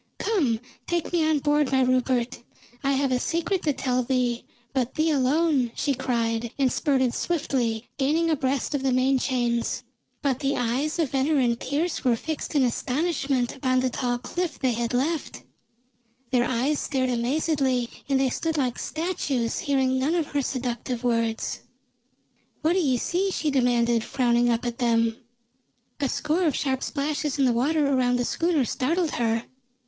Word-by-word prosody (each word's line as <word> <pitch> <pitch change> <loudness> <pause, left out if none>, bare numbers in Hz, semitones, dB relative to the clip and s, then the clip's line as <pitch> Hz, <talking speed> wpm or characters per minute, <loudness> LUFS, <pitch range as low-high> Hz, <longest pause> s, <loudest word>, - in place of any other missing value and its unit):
"Come, 290 - +1 0.3
take 345 0 -1
me 340 -2 +3
on 310 - +3
board, 295 -1 +1
my 265 -1 +4
Rupert. 255 -1 +1 0.4
I 275 0 +2
have 270 0 +1
a 250 - +2
secret 340 +6 -1
to 300 - +1
tell 255 -2 0
thee, 250 -1 0 0.3
but 255 -3 -1
thee 315 +1 +2
alone!" 280 -2 +2
she 285 - 0
cried, 235 -3 -1
and 265 -3 +2
spurted 260 -5 +1
swiftly, 245 -9 -1
gaining 310 +5 +2
abreast 275 -2 0
of 285 - 0
the 265 -1 +1
main 260 +1 +3
chains. 240 -2 0 0.4
But 270 -3 +1
the 280 -1 0
eyes 255 +7 0
of 320 -6 0
Venner 280 +3 +2
and 240 -3 +2
Pearse 310 +6 -2
were 250 -3 +3
fixed 310 +5 -5
in 280 - +4
astonishment 270 0 0
upon 255 -1 +1
the 255 -1 0
tall 245 -1 -1
cliff 350 +8 -3
they 260 -2 +1
had 235 +1 -1
left; 300 +5 -1 0.9
their 245 -2 +3
eyes 260 +4 0
stared 260 -3 0
amazedly, 260 0 +1 0.2
and 270 -1 +3
they 265 -1 +2
stood 320 +3 -1
like 255 -4 0
statues, 290 -8 -2
hearing 265 -2 +1
none 290 +6 +1
of 330 -4 0
her 285 - 0
seductive 250 -2 -3
words. 230 -2 0 1.0
"What 320 +2 +3
do 380 - +2
ye 270 -8 +2
see?" 365 +10 0
she 310 -5 -1
demanded, 240 -3 +2
frowning 240 -1 +2
up 235 +1 0
at 240 -1 -3
them. 230 -2 +2 0.8
A 280 -2 0
score 315 +8 0
of 305 - +2
sharp 265 -2 -1
splashes 295 0 -2
in 275 - +3
the 245 - +3
water 290 +6 +2
around 255 -3 +2
the 245 0 0
schooner 330 -3 +1
startled 325 +7 0
her. 230 -1 0
265 Hz, 170 wpm, -25 LUFS, 245-300 Hz, 1.0 s, my